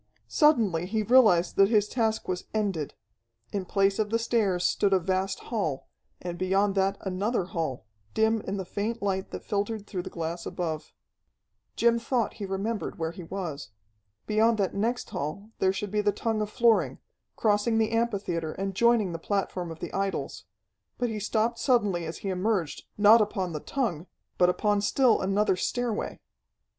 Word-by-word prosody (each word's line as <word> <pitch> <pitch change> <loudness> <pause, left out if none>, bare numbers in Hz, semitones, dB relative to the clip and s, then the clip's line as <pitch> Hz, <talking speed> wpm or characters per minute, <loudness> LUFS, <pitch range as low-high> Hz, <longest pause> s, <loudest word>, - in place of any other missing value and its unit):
Suddenly 210 - +3
he 215 +2 0
realized 210 -7 +5
that 195 0 +6
his 210 -2 +3
task 220 -1 -1
was 180 -1 -3
ended. 195 -9 -1 0.6
In 195 -2 -2
place 195 +2 +2
of 215 -1 +1
the 230 - +2
stairs 210 -6 +1
stood 200 +1 +2
a 190 - +5
vast 190 +2 -1
hall, 160 - -2 0.3
and 175 -1 -6
beyond 195 +2 +2
that 195 0 +1
another 195 +3 -1
hall, 160 - -3 0.3
dim 220 0 +2
in 195 - -2
the 190 - -4
faint 210 +5 -3
light 190 -1 -1
that - - -7
filtered 205 +1 -2
through 185 -3 -4
the - - -7
glass 170 0 -4
above. 160 -4 -4 0.8
Jim 235 0 +3
thought 235 -1 0
he 200 - -3
remembered 200 +3 -3
where 160 0 -2
he 175 - -9
was. 165 - -5 0.6
Beyond 220 +1 +3
that 195 -3 0
next 230 +5 -1
hall 195 +10 -4
there 190 - +3
should 200 0 -4
be 210 0 +1
the 205 0 +2
tongue 220 +1 -1
of 210 - -2
flooring, 230 -1 +3 0.4
crossing 215 +1 +2
the 220 -1 +2
amphitheatre 200 -9 -1
and 195 0 -3
joining 230 -2 +3
the 165 - -5
platform 185 -2 -2
of 165 -1 -9
the - - -5
idols. 195 -8 -3 0.5
But 245 -1 0
he 215 -1 -3
stopped 225 +3 0
suddenly 205 - +2
as 160 - -5
he - - 0
emerged, 185 -3 -1
not 215 +2 +7
upon 190 -4 -1
the 150 - -3
tongue, 190 - -2 0.3
but 180 - +6
upon 205 +2 +1
still 240 +3 +3
another 195 +1 +2
stairway. 235 +4 -2
200 Hz, 170 wpm, -27 LUFS, 180-220 Hz, 0.8 s, not